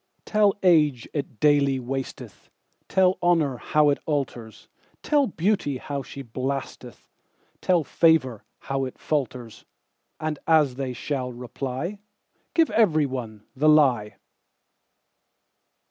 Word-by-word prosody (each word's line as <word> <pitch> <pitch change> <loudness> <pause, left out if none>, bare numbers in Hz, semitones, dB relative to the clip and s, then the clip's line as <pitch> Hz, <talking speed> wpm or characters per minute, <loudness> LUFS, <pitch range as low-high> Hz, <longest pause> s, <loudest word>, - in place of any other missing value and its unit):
Tell 210 -2 +3
age 150 -9 +3
it 140 -6 -5
daily 145 -3 +3
wasteth; 135 +1 -6 0.4
Tell 190 -1 +3
honour 165 -7 +2
how 150 +4 +2
it 140 - -1
alters; 125 -7 -4 0.4
Tell 290 -3 +2
beauty 175 -6 0
how 140 +2 -5
she 140 +1 -9
blasteth; 130 +2 -5 0.5
Tell 175 -3 +2
favour 150 -9 +2 0.2
how 135 -1 -2
it 130 - -8
falters:And 125 +1 -6
as 155 -5 +4
they 135 -2 -3
shall 130 0 -3
reply, 130 - -5 0.6
Give 325 -7 +3
every 175 -9 +3
one 115 -6 -6
the 150 +4 +3
lie. 130 -9 +3
140 Hz, 110 wpm, -24 LUFS, 125-160 Hz, 0.6 s, as